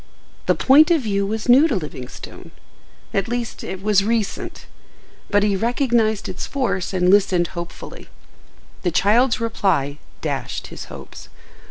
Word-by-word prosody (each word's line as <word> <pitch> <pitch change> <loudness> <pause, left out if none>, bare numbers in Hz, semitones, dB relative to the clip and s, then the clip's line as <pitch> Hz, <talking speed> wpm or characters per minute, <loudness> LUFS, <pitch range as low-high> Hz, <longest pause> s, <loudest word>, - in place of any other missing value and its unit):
The - - +4
point 295 +5 +6
of 335 -4 +3
view 200 -2 0
was 220 +1 -3
new 265 +6 +7
to 270 - -1
Livingstone—at 155 +4 -7
least, 240 0 -4
it 190 0 -6
was 205 -2 +3
recent; 220 -1 -2 0.6
but 205 -1 +3
he 205 -1 +2
recognized 230 -1 +1
its 180 - -5
force 255 -9 -1
and 180 -1 +2
listened 190 -4 +3
hopefully. 170 0 -8 0.7
The 180 - 0
child's 220 +8 +3
reply 175 -11 0 0.2
dashed - - -4
his - - -7
hopes. - - -11
205 Hz, 135 wpm, -21 LUFS, 185-235 Hz, 0.7 s, new